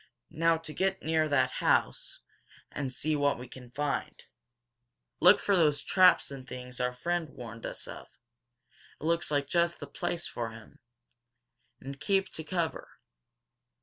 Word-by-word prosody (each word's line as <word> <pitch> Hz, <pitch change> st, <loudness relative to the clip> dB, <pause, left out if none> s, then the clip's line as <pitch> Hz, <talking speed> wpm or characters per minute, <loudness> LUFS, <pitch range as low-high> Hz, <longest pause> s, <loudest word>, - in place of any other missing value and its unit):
Now 165 Hz, +1 st, +3 dB
to 160 Hz, -1 st, -8 dB
get 190 Hz, +2 st, 0 dB
near 160 Hz, 0 st, +2 dB
that 145 Hz, -2 st, +3 dB
house, -, -, +1 dB, 0.5 s
and 135 Hz, -2 st, -3 dB
see 155 Hz, +4 st, 0 dB
what 145 Hz, -1 st, +2 dB
we 125 Hz, +1 st, -8 dB
can 125 Hz, -1 st, -12 dB
find. 145 Hz, +3 st, -3 dB, 1.0 s
Look 180 Hz, +4 st, +8 dB
out -, -, -10 dB
for 200 Hz, -, +2 dB
those 150 Hz, -5 st, +3 dB
traps 185 Hz, -5 st, +5 dB
and 130 Hz, -2 st, -8 dB
things 125 Hz, -1 st, -7 dB
our 125 Hz, 0 st, +1 dB
friend 170 Hz, +6 st, -2 dB
warned 115 Hz, -3 st, -8 dB
us -, -, -7 dB
of. -, -, -9 dB, 0.9 s
It -, -, -12 dB
looks 165 Hz, 0 st, +1 dB
like 145 Hz, -1 st, 0 dB
just 170 Hz, 0 st, +1 dB
the -, -, -7 dB
place 175 Hz, -1 st, -3 dB
for 115 Hz, -1 st, -4 dB
them. 110 Hz, -1 st, -13 dB, 1.0 s
And 135 Hz, +1 st, -8 dB
keep 195 Hz, +5 st, +1 dB
to 160 Hz, -, -5 dB
cover!" 170 Hz, -1 st, -2 dB
150 Hz, 155 wpm, -30 LUFS, 130-170 Hz, 1.0 s, Look